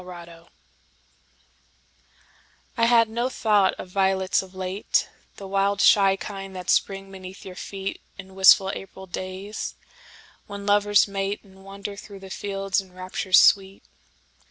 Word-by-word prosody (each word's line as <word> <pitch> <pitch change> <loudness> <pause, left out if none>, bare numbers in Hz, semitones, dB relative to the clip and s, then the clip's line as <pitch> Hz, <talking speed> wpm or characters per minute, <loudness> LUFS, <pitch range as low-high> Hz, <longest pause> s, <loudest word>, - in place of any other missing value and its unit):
Sonnet 170 -2 -12 2.3
I 230 - +3
HAD 230 -1 +5
no 235 +3 -2
thought 210 -6 +2
of 185 - -9
violets 190 0 +1
of 190 0 -14
late, 185 +2 -1 0.3
The 195 - -9
wild, 195 +1 0
shy 195 -2 +5
kind 195 0 -8
that 180 -1 -2
spring 195 0 0
beneath 190 0 -10
your 190 - -8
feetIn 195 0 -8
wistful 190 0 +6
April 190 0 -9
days, 185 +3 -6 0.7
when 200 0 -8
lovers 205 0 +4
mateAnd 195 0 -4
wander 200 +1 -8
through 200 -1 -11
the 190 -1 -11
fields 195 -1 -2
in 190 -2 -18
raptures 185 +1 +1
sweet. 195 0 +3
195 Hz, 130 wpm, -24 LUFS, 190-200 Hz, 2.3 s, wistful